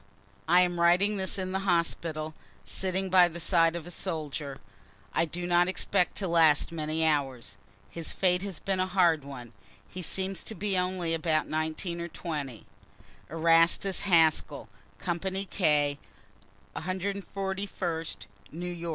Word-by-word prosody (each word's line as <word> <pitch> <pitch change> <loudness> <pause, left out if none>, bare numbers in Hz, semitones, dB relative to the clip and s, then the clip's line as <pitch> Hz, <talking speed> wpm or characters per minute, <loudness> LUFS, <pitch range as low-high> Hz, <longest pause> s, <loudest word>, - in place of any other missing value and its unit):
I 175 +2 +6
am 175 -1 +1
writing 185 +5 +4
this 190 0 -1
in 185 -1 -3
the 190 - 0
hospital, 170 -4 -1 0.3
sitting 190 0 -2
by 180 -1 +7
the 170 0 -7
side 165 -1 +3
of 170 -2 -5
a 175 - -9
soldier, 150 -4 -4 0.6
I 165 - +2
do 175 +2 -5
not 175 0 +3
expect 180 -1 0
to 195 - -2
last 165 -3 +4
many 160 0 -1
hours. 135 -6 -1 0.3
His 165 -2 -4
fate 180 -1 +2
has 195 -5 -5
been 195 -1 -1
a 185 - +1
hard 175 -5 +3
one 125 -4 -9 0.3
he 185 - -7
seems 190 +2 -2
to 220 - -6
be 205 -1 -1
only 180 -2 0
about 160 -1 +1
19 160 +3 -2
or 170 - -3
20 145 -9 -5 0.6
Erastus 165 +4 +3
Haskell, 165 -5 +2 0.3
company 190 +3 -2
K, 145 -7 +1 0.8
141st 190 -2 -3 0.3
N. 175 +1 -5
Y. 170 - -4
170 Hz, 145 wpm, -29 LUFS, 160-185 Hz, 0.8 s, by